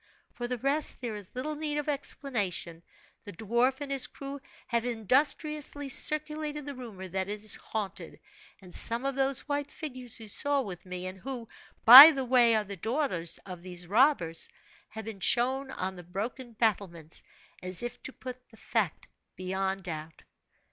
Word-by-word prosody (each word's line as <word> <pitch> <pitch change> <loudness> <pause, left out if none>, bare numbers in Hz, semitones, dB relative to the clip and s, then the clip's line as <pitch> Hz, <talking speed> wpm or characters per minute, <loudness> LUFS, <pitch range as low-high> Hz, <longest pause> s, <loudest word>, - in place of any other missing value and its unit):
For 240 - -5
the 250 0 -3
rest, 280 +5 +2
there 240 -3 -4
is 205 0 -10
little 285 +5 -3
need 300 -1 -3
of 295 - -3
explanation 215 - -2 0.4
the 205 - -9
dwarf 235 - 0
and 285 -1 -5
his 265 -2 +3
crew 275 +1 -8 0.2
have 235 -2 -1
industriously 280 - 0
circulated 300 +1 -1
the 285 - -5
rumor 225 -8 -9
that 190 +2 -3
it - - -2
is 210 0 0
haunted; 205 -3 -5 0.4
and 180 -1 -13
some 235 +3 0
of 275 - 0
those 270 0 +1
white 285 -1 -2
figures 255 -7 -3
you 220 - -10
saw 285 +6 +2
with 185 -6 -8
me, 180 0 -6
and 185 +1 -7
who, 245 0 -7 0.4
by 265 +7 +14
the 270 -4 -2
way, 240 -2 +4
are 215 - +1
the 200 -1 -8
daughters 220 - -1
of 180 -3 -9
these 180 -1 -7
robbers, 200 - +2 0.4
have 220 0 -8
been 220 -3 -7
shown 260 +6 +2
on 190 -6 -4
the 175 - -10
broken 225 +7 -6
battlements, 190 -8 -2 0.4
as 185 +4 +1
if 240 0 -6
to - - -7
put 255 -1 -10
the 225 - -19
fact 215 -9 -2 0.3
beyond 190 +1 -3
doubt. 160 -2 -7
235 Hz, 170 wpm, -29 LUFS, 190-275 Hz, 0.4 s, by